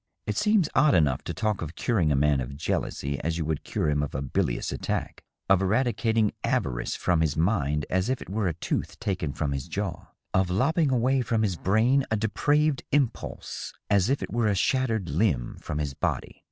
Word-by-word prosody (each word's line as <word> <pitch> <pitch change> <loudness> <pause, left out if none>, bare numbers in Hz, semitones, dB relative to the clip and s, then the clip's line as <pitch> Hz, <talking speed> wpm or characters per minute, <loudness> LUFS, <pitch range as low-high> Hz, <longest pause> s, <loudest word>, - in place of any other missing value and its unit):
It - - -2
seems 210 -5 +3
odd 150 -1 +5
enough 75 -4 +2
to - - -3
talk 105 +5 -1
of 80 +1 -5
curing 90 -11 +1
a - - +3
man 70 -1 +3
of 70 +3 -6
jealousy 70 -2 -2
as 85 +1 -2
you 80 - -2
would 80 -1 -2
cure - - -2
him 75 -1 +2
of 75 - -4
a 65 - -1
bilious 60 -3 -1
attack; - - -3 0.3
of 95 -1 +4
eradicating 110 +1 +1
avarice - - -1
from 85 -2 +1
his 75 -3 0
mind 75 -5 +1
as 95 +5 0
if 130 - 0
it - - -9
were 100 +2 -1
a 85 - -1
tooth - - -3
taken 90 -7 -2
from 70 0 -2
his 70 -2 -3
jaw; - - -4 0.3
of 95 -1 +2
lopping 140 - +2
away 130 +1 +2
from 115 -2 0
his 95 -4 0
brain 115 +10 +3
a 110 - +1
depraved 145 +7 +1
impulse 140 -4 -2 0.2
as 100 +1 +4
if 140 - +1
it - - -6
were 120 -2 +2
a 105 - +2
shattered 115 -2 +1
limb 75 - 0
from 75 - -4
his 75 -2 -2
body. - - -3
95 Hz, 205 wpm, -27 LUFS, 75-120 Hz, 0.3 s, odd